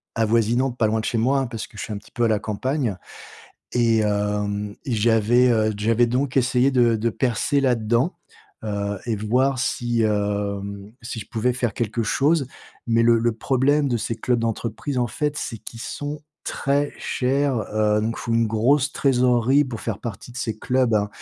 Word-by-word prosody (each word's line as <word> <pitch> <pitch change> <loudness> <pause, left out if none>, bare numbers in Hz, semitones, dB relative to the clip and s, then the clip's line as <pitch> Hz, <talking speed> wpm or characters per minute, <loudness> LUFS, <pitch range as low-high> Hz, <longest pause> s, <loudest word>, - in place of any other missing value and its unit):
avoisinantes, 115 +3 +1
pas 110 - +3
loin 110 +1 0
de - - -6
chez 115 - -1
moi, 135 +4 +2
hein, 135 - -1
parce 115 -2 -5
que 110 - -17
je - - -4
suis 110 - -5
un - - -4
petit 105 - -14
peu 120 - 0
à - - +2
la 110 -2 +2
campagne 115 +1 -2 0.8
et, 115 -2 +3
hem, 105 0 -1
et 130 - -3
j'avais, 115 +3 +3
heu, 110 -2 +2
j'avais 115 +3 +2
donc 130 +3 -1
essayé 125 +1 +3
de 120 -3 +4
de 115 +2 0
percer 130 +4 0
là-dedans, 125 +4 +1 0.5
heu, 100 -1 -2
et 115 - 0
voir 125 +6 +1
si, 120 -1 0
hem, 100 -1 -2
si 115 -1 -6
je 105 - -9
pouvais 120 +2 0
faire 120 -2 -1
quelque 115 0 -1
chose, 140 +5 +2 0.4
mais 115 0 +3
le 115 0 +5
le 120 +1 +1
problème 140 +5 +1
de 120 - +1
ces 110 +1 -2
clubs 125 +1 0
d'entreprise 115 +4 -3
en 120 -1 +1
fait, 150 +5 -2
c'est 115 -4 -4
qu'ils 115 +1 -10
sont 145 +3 -5 0.2
très 140 +1 0
chers, 135 +1 0 0.2
heu, 105 0 +2
donc 115 +1 -2
faut 115 - -3
une 115 -1 +3
grosse 130 +6 +2
trésorerie 130 +1 +3
pour 120 -4 -6
faire 110 -3 -3
partie 115 +1 -7
de 125 - -12
ces 110 -3 -3
clubs, 125 -2 +1
hein. 105 -1 +1
115 Hz, 190 wpm, -23 LUFS, 110-130 Hz, 0.8 s, le